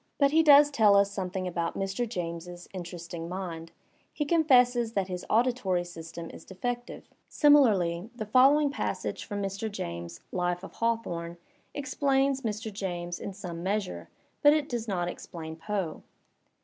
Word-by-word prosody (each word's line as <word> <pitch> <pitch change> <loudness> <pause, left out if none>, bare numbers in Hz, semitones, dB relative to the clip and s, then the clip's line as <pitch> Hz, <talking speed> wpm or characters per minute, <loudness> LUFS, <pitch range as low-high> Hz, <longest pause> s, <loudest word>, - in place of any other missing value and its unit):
But 280 -1 +4
he 320 +2 +5
does 290 -1 +7
tell 215 -6 +5
us 200 0 +4
something 185 -1 -3
about 170 -1 -2
Mr. 195 +5 -2
James's 175 -2 -5
interesting 170 -2 -6
mind; 170 -3 -5 0.4
he 295 - -2
confesses 250 -7 +4
that 195 -3 -1
his 180 -1 -5
auditory 225 -6 +2
system 165 -1 -8
is - - -11
defective. 240 +6 -5 0.2
Similarly, 215 - +4
the 220 -2 -4
following 275 +6 +5
passage - - -3
from 205 -1 -4
Mr. 195 +3 -3
James's 85 - -6
'* - - -41
life 175 +1 -1
of - - -9
Hawthorne" 175 -8 -2 0.4
explains 270 -1 +1
Mr. 220 -2 -4
James 175 -3 -4
in - - -5
some 180 -4 -7
measure, 185 - -2 0.3
but 290 0 +7
it 305 -2 0
does 240 -4 -3
not 180 -4 -1
explain 160 -2 -7
Poe. 165 0 -3
195 Hz, 150 wpm, -28 LUFS, 175-245 Hz, 0.4 s, does